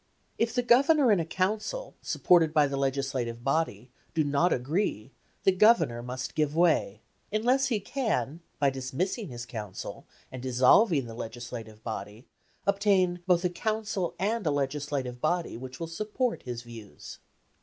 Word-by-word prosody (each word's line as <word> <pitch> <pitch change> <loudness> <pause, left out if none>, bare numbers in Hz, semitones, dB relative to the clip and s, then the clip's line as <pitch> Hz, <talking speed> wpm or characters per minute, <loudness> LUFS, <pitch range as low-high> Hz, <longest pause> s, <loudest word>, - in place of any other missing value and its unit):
If 230 +1 0
the 245 - +2
Governor 270 +2 +5
and 195 -5 +4
a - - -3
Council, 215 - -2
supported 165 -3 +3
by 150 -1 +6
the 140 -1 -2
Legislative 135 -3 -2
Body, 135 -5 -1 0.2
do 160 - +3
not 145 +5 +2
agree, 135 - -1 0.3
the 195 - +5
Governor 185 - +4
must 125 +2 -5
give 150 -1 0
way, 160 - +2 0.3
unless 250 +6 +2
he 230 -5 0
can, 195 - -2 0.2
by 140 -1 +2
dismissing 145 - -3
his 120 -1 -7
Council, 105 -5 -7 0.2
and 130 - -7
dissolving 130 - +4
the 115 - -8
Legislative 115 -1 -8
Body, 105 +1 -6 0.4
obtain 195 -3 +2
both 180 -1 +3
a - - +3
Council 215 -2 -2
and 205 0 -1
a - - +4
Legislative 140 -3 -2
Body 175 +2 0
which 130 +2 -8
will 165 - -3
support 215 +8 -2
his 120 -2 -6
views. 115 -3 -11
150 Hz, 150 wpm, -28 LUFS, 125-200 Hz, 0.4 s, by